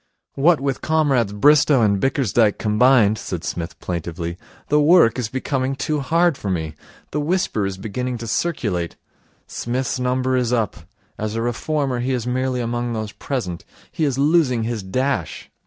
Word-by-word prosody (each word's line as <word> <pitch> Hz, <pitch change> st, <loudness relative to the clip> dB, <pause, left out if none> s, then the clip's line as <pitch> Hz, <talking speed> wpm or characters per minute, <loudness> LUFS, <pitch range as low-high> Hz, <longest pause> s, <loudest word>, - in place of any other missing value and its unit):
'What 160 Hz, +4 st, +3 dB
with 135 Hz, -1 st, -2 dB
Comrades 140 Hz, -9 st, +2 dB
Bristow 140 Hz, +4 st, +4 dB
and 100 Hz, -2 st, +2 dB
Bickersdyke 120 Hz, -5 st, +2 dB
combined,' 110 Hz, 0 st, +3 dB
said 90 Hz, -7 st, -5 dB
Psmith 85 Hz, -1 st, -5 dB
plaintively, 85 Hz, -1 st, -4 dB, 0.3 s
'the 150 Hz, -, +4 dB
work 155 Hz, -6 st, +5 dB
is 115 Hz, -4 st, -2 dB
becoming 130 Hz, +1 st, -2 dB
too 150 Hz, +2 st, -1 dB
hard 165 Hz, +2 st, +2 dB
for 100 Hz, -, -4 dB
me. 80 Hz, -4 st, -2 dB, 0.4 s
The 150 Hz, -, -1 dB
whisper 150 Hz, -, 0 dB
is 95 Hz, -1 st, -5 dB
beginning 125 Hz, +5 st, -4 dB
to 115 Hz, -, -7 dB
circulate, 110 Hz, -, -2 dB, 0.5 s
"Psmith's 125 Hz, +2 st, -3 dB
number 130 Hz, +1 st, 0 dB
is 125 Hz, -2 st, 0 dB
up 110 Hz, -8 st, -1 dB, 0.3 s
As 110 Hz, 0 st, -3 dB
a 115 Hz, -, -1 dB
reformer 130 Hz, +2 st, -1 dB
he 130 Hz, +2 st, -1 dB
is 120 Hz, -2 st, -2 dB
merely 130 Hz, 0 st, -1 dB
among 120 Hz, 0 st, -2 dB
those 110 Hz, -2 st, -4 dB
present. 105 Hz, -13 st, -4 dB, 0.3 s
He 160 Hz, -, -2 dB
is 140 Hz, -4 st, 0 dB
losing 140 Hz, -5 st, +3 dB
his 115 Hz, -1 st, -2 dB
dash." 100 Hz, -, -2 dB
125 Hz, 160 wpm, -21 LUFS, 105-135 Hz, 0.5 s, work